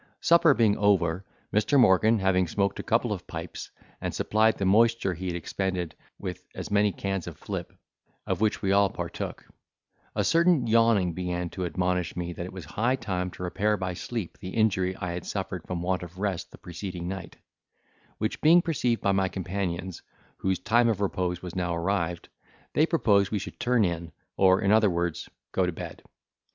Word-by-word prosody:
Supper 170 Hz, -4 st, +5 dB
being 110 Hz, -3 st, +3 dB
over, 95 Hz, -3 st, +2 dB, 0.3 s
Mr. 110 Hz, +7 st, +3 dB
Morgan 110 Hz, 0 st, +5 dB
having 95 Hz, -2 st, +2 dB
smoked 100 Hz, +4 st, 0 dB
a -, -, -3 dB
couple -, -, +1 dB
of -, -, -8 dB
pipes, -, -, -6 dB, 0.3 s
and -, -, -3 dB
supplied 110 Hz, +1 st, +2 dB
the 100 Hz, -, -1 dB
moisture 110 Hz, 0 st, +3 dB
he 90 Hz, +2 st, -5 dB
had 90 Hz, -, -2 dB
expended 90 Hz, 0 st, -2 dB, 0.2 s
with -, -, -6 dB
as -, -, -6 dB
many 105 Hz, 0 st, +3 dB
cans 95 Hz, -2 st, -3 dB
of -, -, -7 dB
flip, -, -, -5 dB, 0.5 s
of -, -, -2 dB
which 110 Hz, -1 st, +1 dB
we 95 Hz, -, +2 dB
all 100 Hz, 0 st, +4 dB
partook, -, -, -5 dB, 0.7 s
a -, -, +1 dB
certain 165 Hz, -5 st, +3 dB
yawning 115 Hz, -6 st, +3 dB
began 90 Hz, 0 st, -3 dB
to 90 Hz, -2 st, -3 dB
admonish 90 Hz, 0 st, -1 dB
me 85 Hz, 0 st, -3 dB
that 85 Hz, +1 st, -5 dB
it -, -, -9 dB
was 95 Hz, -4 st, -8 dB
high 115 Hz, -, 0 dB
time 90 Hz, -7 st, -3 dB
to 90 Hz, -, -9 dB
repair 105 Hz, +4 st, 0 dB
by 95 Hz, -2 st, -3 dB
sleep 110 Hz, +1 st, -5 dB
the 95 Hz, -, -6 dB
injury 95 Hz, -4 st, +2 dB
I 90 Hz, -2 st, -4 dB
had 85 Hz, 0 st, -4 dB
suffered 95 Hz, -3 st, -4 dB
from 90 Hz, -1 st, -3 dB
want 90 Hz, 0 st, 0 dB
of 90 Hz, 0 st, -9 dB
rest 95 Hz, -3 st, -2 dB
the -, -, -14 dB
preceding 90 Hz, 0 st, -6 dB
night; 95 Hz, -2 st, -6 dB, 0.8 s
which -, -, -2 dB
being 170 Hz, +3 st, +6 dB
perceived 125 Hz, -8 st, 0 dB
by 100 Hz, -, +3 dB
my 95 Hz, -1 st, +2 dB
companions, 95 Hz, -2 st, -4 dB, 0.4 s
whose 95 Hz, -1 st, 0 dB
time 120 Hz, +2 st, +3 dB
of 110 Hz, -4 st, 0 dB
repose 90 Hz, -3 st, -1 dB
was 90 Hz, -1 st, -7 dB
now 90 Hz, -2 st, -1 dB
arrived, 85 Hz, -1 st, -1 dB, 0.5 s
they 155 Hz, -, +3 dB
proposed 100 Hz, -, +3 dB
we 105 Hz, -, -1 dB
should 100 Hz, -, -7 dB
turn 120 Hz, -3 st, +3 dB
in, 85 Hz, -1 st, -3 dB, 0.2 s
or 95 Hz, -1 st, +4 dB
in 100 Hz, -, +3 dB
other 110 Hz, -1 st, +5 dB
words, 85 Hz, -2 st, -2 dB, 0.2 s
go 95 Hz, -1 st, +1 dB
to -, -, 0 dB
bed. 80 Hz, -, -8 dB
95 Hz, 190 wpm, -27 LUFS, 90-105 Hz, 0.8 s, being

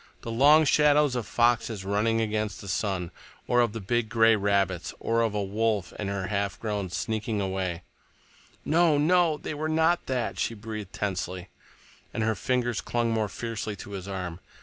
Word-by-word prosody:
"The 115 Hz, -, -4 dB
long 145 Hz, +7 st, +6 dB
shadows 150 Hz, -2 st, +4 dB
of 120 Hz, -4 st, -3 dB
foxes 115 Hz, -4 st, +1 dB
running 110 Hz, +3 st, +1 dB
against 110 Hz, -2 st, -2 dB
the 100 Hz, -, -10 dB
sun, 95 Hz, -2 st, -2 dB, 0.4 s
or 120 Hz, 0 st, +4 dB
of 120 Hz, -3 st, +2 dB
the 115 Hz, -, -5 dB
big 110 Hz, +3 st, -1 dB
gray 115 Hz, -1 st, +5 dB
rabbits, 100 Hz, -3 st, 0 dB
or 115 Hz, 0 st, +1 dB
of 110 Hz, -2 st, 0 dB
a 105 Hz, -, 0 dB
wolf 105 Hz, -2 st, -1 dB
and 100 Hz, -2 st, -3 dB
her 100 Hz, -1 st, -2 dB
half 100 Hz, 0 st, -2 dB
grown 105 Hz, -4 st, -3 dB
sneaking 110 Hz, +3 st, -2 dB
away—" 95 Hz, -3 st, -2 dB, 0.8 s
"No, 160 Hz, -1 st, +4 dB
no, 165 Hz, +1 st, +3 dB
they 155 Hz, -, -5 dB
were 155 Hz, +1 st, -3 dB
not 160 Hz, +2 st, +2 dB
that," 120 Hz, -8 st, -2 dB
she 115 Hz, -, -1 dB
breathed 105 Hz, -2 st, -7 dB
tensely, 95 Hz, -2 st, -3 dB, 0.7 s
and 110 Hz, -, 0 dB
her 110 Hz, 0 st, +2 dB
fingers 120 Hz, +1 st, -1 dB
clung 120 Hz, -1 st, -1 dB
more 110 Hz, -2 st, 0 dB
fiercely 115 Hz, -2 st, -4 dB
to 100 Hz, -, -10 dB
his 95 Hz, -1 st, -6 dB
arm. 90 Hz, -3 st, -5 dB
110 Hz, 175 wpm, -27 LUFS, 100-120 Hz, 0.8 s, long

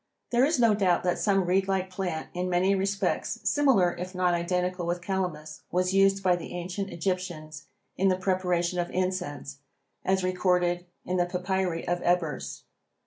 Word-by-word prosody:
There 245 Hz, +1 st, +4 dB
is 300 Hz, +3 st, +3 dB
no 230 Hz, -3 st, +5 dB
doubt 190 Hz, -4 st, +2 dB
that 180 Hz, -1 st, 0 dB
some 195 Hz, -3 st, +2 dB
reedlike 190 Hz, +1 st, +1 dB
plant 180 Hz, -4 st, -3 dB
in 180 Hz, +1 st, -2 dB
many 180 Hz, +2 st, +3 dB
respects 195 Hz, +1 st, -1 dB
similar 260 Hz, -, +3 dB
if 185 Hz, +1 st, -6 dB
not 180 Hz, -1 st, +2 dB
identical 180 Hz, +1 st, -1 dB
with 175 Hz, +1 st, -1 dB
calamus 180 Hz, -5 st, -3 dB
was 180 Hz, +1 st, +1 dB
used 195 Hz, 0 st, +4 dB
by 180 Hz, -1 st, +4 dB
the 175 Hz, -, -7 dB
ancient 180 Hz, +3 st, -4 dB
Egyptians 165 Hz, -4 st, -4 dB, 0.3 s
in 195 Hz, -, +3 dB
the 185 Hz, -1 st, +3 dB
preparation 180 Hz, -2 st, 0 dB
of 175 Hz, 0 st, -1 dB
incense 180 Hz, -6 st, -3 dB, 0.4 s
as 190 Hz, 0 st, +1 dB
recorded 180 Hz, -1 st, +1 dB, 0.2 s
in 185 Hz, -, -1 dB
the 175 Hz, 0 st, +2 dB
papyri 180 Hz, -1 st, -2 dB
of 175 Hz, 0 st, 0 dB
Ebers. 175 Hz, -5 st, -1 dB
180 Hz, 160 wpm, -27 LUFS, 175-190 Hz, 0.4 s, no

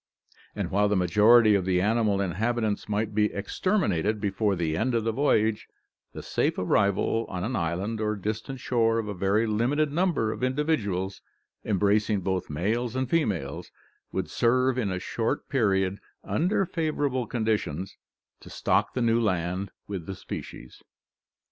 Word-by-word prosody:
And -, -, -3 dB
while 105 Hz, +2 st, +3 dB
the 105 Hz, -, +2 dB
majority 105 Hz, +5 st, +5 dB
of 100 Hz, -2 st, +2 dB
the 90 Hz, 0 st, +1 dB
animal 105 Hz, 0 st, +2 dB
inhabitants 110 Hz, +3 st, -1 dB
might 105 Hz, +1 st, -1 dB
be 105 Hz, 0 st, +2 dB
exterminated 105 Hz, -, 0 dB
before 100 Hz, 0 st, 0 dB
the 80 Hz, -3 st, -1 dB
end 120 Hz, +7 st, 0 dB
of 115 Hz, -, +1 dB
the 115 Hz, -, 0 dB
voyage, 110 Hz, -4 st, +1 dB, 0.5 s
the -, -, -7 dB
safe -, -, 0 dB
arrival 100 Hz, +4 st, +1 dB
on 90 Hz, -1 st, -4 dB
an 125 Hz, +5 st, -2 dB
island 95 Hz, +6 st, -2 dB
or 105 Hz, 0 st, 0 dB
distant 110 Hz, +6 st, -4 dB
shore 115 Hz, -3 st, +1 dB
of 115 Hz, -2 st, -2 dB
a 105 Hz, -, -3 dB
very 100 Hz, +4 st, +1 dB
limited 125 Hz, +8 st, +1 dB
number 160 Hz, -9 st, +1 dB
of -, -, -6 dB
individuals, 125 Hz, -, -1 dB, 0.4 s
embracing 105 Hz, 0 st, +1 dB
both 95 Hz, -1 st, -2 dB
males 110 Hz, +10 st, -1 dB
and 130 Hz, -1 st, -2 dB
females, 100 Hz, -, -1 dB, 0.4 s
would -, -, -2 dB
serve 125 Hz, +2 st, +2 dB
in 105 Hz, -5 st, 0 dB
a 95 Hz, -, -2 dB
short 115 Hz, +8 st, -2 dB
period, 100 Hz, -6 st, +1 dB, 0.2 s
under 190 Hz, +3 st, +1 dB
favourable 145 Hz, -7 st, -1 dB
conditions, 105 Hz, -7 st, -2 dB, 0.4 s
to -, -, -13 dB
stock -, -, 0 dB
the 125 Hz, -, 0 dB
new 115 Hz, 0 st, +3 dB
land 90 Hz, -1 st, -1 dB, 0.2 s
with 95 Hz, -5 st, -5 dB
the 95 Hz, -, -4 dB
species. 65 Hz, -, -9 dB
105 Hz, 155 wpm, -27 LUFS, 95-120 Hz, 0.5 s, majority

